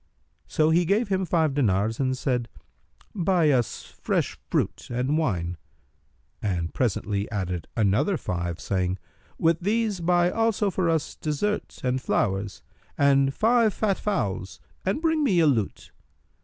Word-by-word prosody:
So 155 0 +2
he 170 +2 +4
gave 200 +5 +1
him 190 -1 +1
five 160 -4 +1
dinars 110 -4 +1
and 130 -1 0
said, 125 -4 -1 0.6
"Buy 175 -5 +2
us 125 -4 0
fresh - - -2
fruit - - -1
and 125 +4 0
wine;" 90 - -1 0.8
and 85 -5 -2
presently 105 -4 -1
added 90 -5 -3
other 115 - +2
five, 85 - -3
saying, 95 -1 -1 0.4
"With 165 0 +2
these 210 +1 0
buy 175 +1 +3
also 225 -2 +1
for 180 -2 0
us 160 -2 -1
dessert[FN#310] 160 +8 -2
and 130 0 0
flowers 100 -4 -1 0.3
and 140 -1 +4
five 225 - +3
fat 200 -3 0
fowls 100 - -2 0.2
and 195 - -1
bring 320 -2 +2
me 195 -11 +3
a 165 - +5
lute." 115 -9 0
145 Hz, 140 wpm, -25 LUFS, -, 0.8 s, a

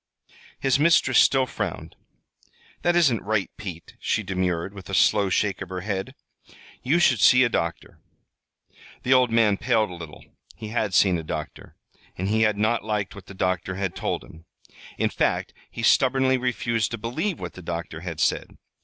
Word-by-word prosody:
His 135 0 +2
mistress 145 -5 +4
still 135 -1 +4
frowned. - - -5 0.9
"That 175 0 +2
isn't 140 -10 +3
right, 105 -1 -1
Pete," 85 -5 -8
she 110 - -1
demurred, 95 -1 -2
with 100 -1 -11
a 95 - -1
slow 100 -1 +3
shake 100 +1 0
of 95 - -6
her 90 -1 -5
head. 95 -1 -4 0.7
"You 145 +7 +2
should 130 -9 +3
see 125 +5 +6
a 125 - +2
doctor." 85 -6 -3 1.0
The 130 - +3
old 130 -1 +4
man 115 -3 +3
paled 110 -3 +1
a - - -7
little. 80 -4 -10 0.3
He 110 - -8
had 110 -4 -1
seen 90 -4 +4
a - - -6
doctor, 75 0 -7 0.4
and 95 +2 -2
he 110 +1 +2
had 110 -2 +2
not 110 +2 +1
liked 105 -2 -2
what 100 -2 -12
the 95 - -11
doctor 95 0 -1
had 95 -2 -3
told - - -3
him. 80 0 -15 0.5
In - - 0
fact, - - -1 0.2
he 115 - -7
stubbornly 130 +2 +3
refused 120 -3 -1
to 115 - -4
believe 155 - -3
what - - -6
the 95 - -11
doctor 85 -1 -5
had 85 -3 -6
said. - - -1
105 Hz, 180 wpm, -24 LUFS, 95-125 Hz, 1.0 s, see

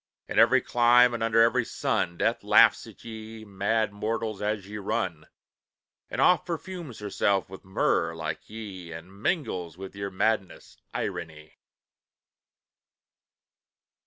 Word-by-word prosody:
In - - 0
every - - +6
clime 120 0 +5
and 120 - -3
under 115 0 +4
every 115 +1 +3
sun, 85 -5 -1
Death - - 0
laughs - - +5
at - - -14
ye, 110 -1 -9
mad 100 +2 0
mortals, 110 0 -3
as 105 -2 -2
ye 105 +1 -6
run; 100 - -3 0.8
And - - -5
oft 180 - +5
perfumes 170 - -6
herself 100 -2 0
with 95 - -10
myrrh, 85 -3 0
like 80 -1 -5
ye 100 -6 -8
And 90 +5 -11
mingles 95 - -2
with 95 0 -9
your 100 0 -4
madness, 95 0 -2
irony!" 80 -1 -6
105 Hz, 130 wpm, -27 LUFS, 95-115 Hz, 0.8 s, every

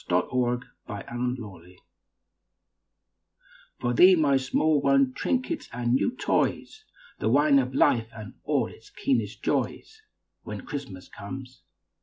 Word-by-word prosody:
WHEN 90 0 +2
CHRISTMAS 125 -4 -3
COMES 105 -8 -5 2.0
For 120 - 0
thee, 185 +8 +7
my 145 -4 +3
small 145 +3 +2
one 140 -1 +3
trinkets 260 - -2
and 120 0 -1
new 240 - +1
toys, 435 +10 -1 0.3
The - - 0
wine 140 +2 +5
of 130 0 -2
life 115 -4 +3
and 110 -3 -9
all - - +1
its - - -13
keenest 115 -5 -2
joys, 440 0 -2 0.4
When - - -7
Christmas 135 - -7
comes. 130 +4 -9
125 Hz, 120 wpm, -26 LUFS, 115-140 Hz, 2.0 s, thee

